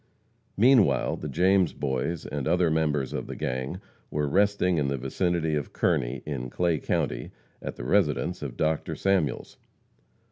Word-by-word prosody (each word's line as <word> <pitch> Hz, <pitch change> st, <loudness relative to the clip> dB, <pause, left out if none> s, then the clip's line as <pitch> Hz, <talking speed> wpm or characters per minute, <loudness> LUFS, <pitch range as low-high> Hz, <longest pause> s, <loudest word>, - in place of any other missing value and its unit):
Meanwhile 120 Hz, 0 st, +4 dB
the 75 Hz, -, -5 dB
James 90 Hz, +4 st, +3 dB
Boys 70 Hz, +4 st, -2 dB
and 70 Hz, -3 st, -3 dB
other 85 Hz, 0 st, +3 dB
members 75 Hz, -4 st, 0 dB
of -, -, -4 dB
the -, -, -6 dB
gang 65 Hz, +7 st, -3 dB, 0.3 s
were 75 Hz, 0 st, -1 dB
resting 95 Hz, 0 st, +2 dB
in 70 Hz, -, +1 dB
the 70 Hz, 0 st, -1 dB
vicinity 80 Hz, +5 st, -1 dB
of 75 Hz, -2 st, -2 dB
Kearney, 60 Hz, +2 st, 0 dB
in 65 Hz, -4 st, -4 dB
Clay 85 Hz, +2 st, 0 dB
county, -, -, -1 dB, 0.3 s
at -, -, -5 dB
the -, -, -7 dB
residence 90 Hz, 0 st, +1 dB
of 70 Hz, -4 st, -6 dB
Dr. 80 Hz, 0 st, 0 dB
Samuels. 95 Hz, -7 st, 0 dB
80 Hz, 150 wpm, -27 LUFS, 70-90 Hz, 0.3 s, Meanwhile